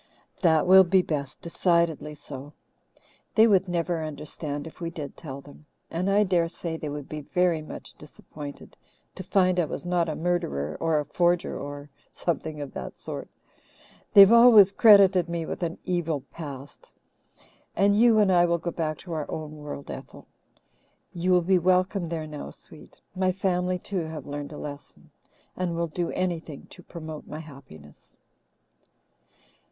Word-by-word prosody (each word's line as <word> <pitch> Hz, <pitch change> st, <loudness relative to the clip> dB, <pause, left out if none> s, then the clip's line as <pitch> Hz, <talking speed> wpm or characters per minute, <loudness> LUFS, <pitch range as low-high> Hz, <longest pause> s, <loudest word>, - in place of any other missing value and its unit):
"That 160 Hz, -3 st, +4 dB
will 190 Hz, +1 st, +8 dB
be 185 Hz, +1 st, +3 dB
best 140 Hz, -5 st, -4 dB
decidedly 170 Hz, -3 st, 0 dB
so. 145 Hz, 0 st, -10 dB, 0.8 s
They 220 Hz, -, +7 dB
would 195 Hz, -4 st, +3 dB
never 170 Hz, -1 st, -1 dB
understand 150 Hz, -1 st, -5 dB
if 160 Hz, -, -12 dB
we 170 Hz, -, -2 dB
did 155 Hz, -4 st, -7 dB
tell 140 Hz, -3 st, -8 dB
them. 145 Hz, +2 st, -16 dB, 0.2 s
And 180 Hz, +4 st, -1 dB
I 205 Hz, +1 st, +4 dB
daresay 170 Hz, -3 st, -1 dB
they 155 Hz, -2 st, -5 dB
would 145 Hz, -1 st, -6 dB
be 155 Hz, 0 st, -6 dB
very 175 Hz, +1 st, +1 dB
much 155 Hz, -, -9 dB
disappointed 145 Hz, -2 st, -11 dB, 0.4 s
to -, -, -8 dB
find 185 Hz, -2 st, +2 dB
I 175 Hz, -, +2 dB
was 155 Hz, -, -6 dB
not 175 Hz, -2 st, +1 dB
a 155 Hz, -, -3 dB
murderer 75 Hz, -, -2 dB
or 160 Hz, -2 st, +1 dB
a 150 Hz, -, -3 dB
forger 175 Hz, +4 st, +1 dB
or 145 Hz, 0 st, -7 dB, 0.2 s
something 160 Hz, -3 st, -3 dB
of 140 Hz, -, -7 dB
that -, -, -7 dB
sort. -, -, -7 dB, 0.8 s
They 200 Hz, -, +9 dB
have 195 Hz, +2 st, +9 dB
always 230 Hz, -5 st, +8 dB
credited 195 Hz, -5 st, +6 dB
me 170 Hz, -1 st, -3 dB
with -, -, -6 dB
an 170 Hz, -1 st, -2 dB
evil 165 Hz, -5 st, -1 dB
past. 140 Hz, -4 st, -9 dB, 0.8 s
And 200 Hz, +1 st, +3 dB
you 230 Hz, +1 st, +5 dB
and 205 Hz, -3 st, +4 dB
I 175 Hz, -1 st, +5 dB
will 170 Hz, 0 st, +1 dB
go 170 Hz, +1 st, -4 dB
back 155 Hz, -2 st, -3 dB
to 175 Hz, -, -7 dB
our 155 Hz, -2 st, -4 dB
own 155 Hz, -1 st, -6 dB
world, 150 Hz, -1 st, -8 dB
Ethel. -, -, -10 dB, 0.9 s
You 175 Hz, +1 st, -2 dB
will 180 Hz, -1 st, +4 dB
be 185 Hz, +1 st, +3 dB
welcome 185 Hz, 0 st, +1 dB
there 160 Hz, -2 st, -3 dB
now, 150 Hz, -, -7 dB
sweet -, -, -16 dB, 0.2 s
my 185 Hz, 0 st, +1 dB
family, 180 Hz, -1 st, 0 dB
too, 180 Hz, 0 st, -3 dB
have 160 Hz, -1 st, -7 dB
learned 145 Hz, 0 st, -6 dB
a 150 Hz, -, -8 dB
lesson, 145 Hz, -1 st, -10 dB, 0.4 s
and 180 Hz, -2 st, -2 dB
will 170 Hz, 0 st, 0 dB
do 170 Hz, +2 st, -3 dB
anything 170 Hz, -5 st, -3 dB
to 180 Hz, -, -12 dB
promote 160 Hz, -3 st, -9 dB
my 150 Hz, -, -7 dB
happiness." 135 Hz, -, -14 dB
170 Hz, 165 wpm, -26 LUFS, 150-180 Hz, 0.9 s, They